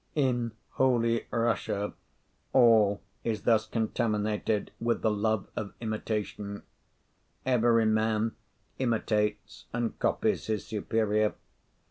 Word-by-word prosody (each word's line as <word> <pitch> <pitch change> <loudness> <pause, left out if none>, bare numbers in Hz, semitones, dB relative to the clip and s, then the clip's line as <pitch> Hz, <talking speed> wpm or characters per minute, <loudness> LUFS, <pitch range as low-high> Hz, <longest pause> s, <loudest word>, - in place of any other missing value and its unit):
In 120 -5 +1 0.2
Holy 115 -3 +2
Russia 115 -3 0 0.6
all 110 -5 +5 0.2
is 110 -3 -2
thus 110 -2 +3
contaminated 110 -2 0
with 115 0 0
the 110 - +3
love 105 0 0
of 100 - -5
imitation; 105 -2 -3 0.8
every 120 -3 +4
man 110 +1 +2 0.5
imitates 105 -4 -1
and 120 -1 -2
copies - - +1
his 110 -1 -1
superior. 110 -1 0
110 Hz, 95 wpm, -29 LUFS, 105-115 Hz, 0.8 s, all